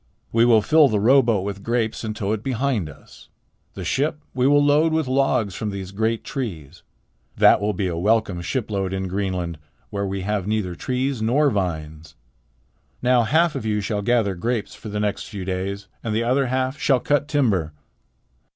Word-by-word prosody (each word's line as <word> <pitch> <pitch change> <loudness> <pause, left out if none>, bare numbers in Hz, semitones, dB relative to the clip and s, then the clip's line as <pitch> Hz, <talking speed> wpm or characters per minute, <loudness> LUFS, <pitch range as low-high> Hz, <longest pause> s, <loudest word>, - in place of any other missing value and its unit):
We 115 +1 +4
will 115 -3 +5
fill 155 +2 +5
the 110 -5 0
rowboat 115 -3 +4
with 100 -1 -5
grapes 115 0 -1
and 110 -1 -4
tow 100 -1 -2
it 110 -1 -1
behind 125 - -1
us. 75 - -16 0.5
The - - -6
ship 150 +3 0
we 125 +1 +2
will 145 0 +4
load 150 +3 +4
with 160 -3 0
logs 130 -6 +1
from 105 +3 -3
these 100 -2 -6
great 110 +3 -1
trees. 90 - -6 0.6
That - - +6
will 105 +1 0
be 100 - -2
a 90 -2 -2
welcome 100 0 +1
shipload 100 -3 -2
in 95 0 -2
Greenland, 90 -4 -3 0.3
where 100 -1 -2
we 95 0 -3
have 100 0 -2
neither 105 -4 -1
trees 130 +6 -2
nor 135 +6 +3
vines. 80 -6 -4 0.9
Now 125 0 +4
half 160 +6 +3
of - - -4
you 105 -1 0
shall 105 0 -2
gather 110 -2 +1
grapes 115 +5 -2
for 110 - -9
the 105 0 -3
next 105 -1 -1
few 100 -3 -7
days, 95 +2 -3 0.2
and 110 -2 -2
the 115 - +1
other 130 +3 +1
half 130 +3 -1
shall 135 -3 +3
cut 145 +3 0
timber." 105 - +1
110 Hz, 185 wpm, -22 LUFS, 95-130 Hz, 0.9 s, That